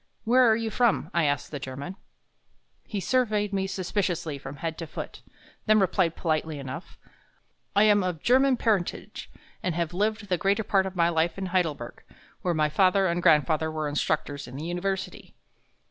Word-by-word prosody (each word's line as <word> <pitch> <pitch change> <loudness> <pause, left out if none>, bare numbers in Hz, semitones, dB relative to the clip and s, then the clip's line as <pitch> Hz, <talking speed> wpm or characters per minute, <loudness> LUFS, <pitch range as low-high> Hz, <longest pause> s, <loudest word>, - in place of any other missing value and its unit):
"Where 245 +2 +5
are 220 - +5
you 225 0 -2
from?" 240 -3 +1
I 170 -2 +2
asked 145 -2 -1
the 145 - -4
German. 140 +7 -6 0.9
He 205 - -3
surveyed 210 -2 +1
me 195 -1 0
suspiciously 180 -5 -2
from 135 +1 -8
head 160 +3 -4
to 165 - -5
foot, - - -7 0.5
then 215 0 +5
replied 185 -3 +2
politely 155 -2 -1
enough: 140 +5 -8 0.8
"I 205 - +6
am 210 -1 +5
of 180 -4 -3
German 260 +1 +4
parentage 210 -7 -1 0.3
and 180 -3 -2
have 170 -1 -2
lived 210 +3 -1
the 180 -2 0
greater 200 +2 +1
part 195 -2 +2
of 190 - -7
my 170 -1 +3
life 165 +1 0
in 195 - -3
Heidelberg, 155 -10 -1 0.4
where 175 -2 0
my 155 -1 +3
father 190 +4 +3
and 175 -1 0
grandfather 155 0 +3
were 155 -1 -2
instructors 145 -1 -2
in 125 - -10
the 150 +3 -5
University." 185 +3 -4
180 Hz, 175 wpm, -27 LUFS, 155-205 Hz, 0.9 s, I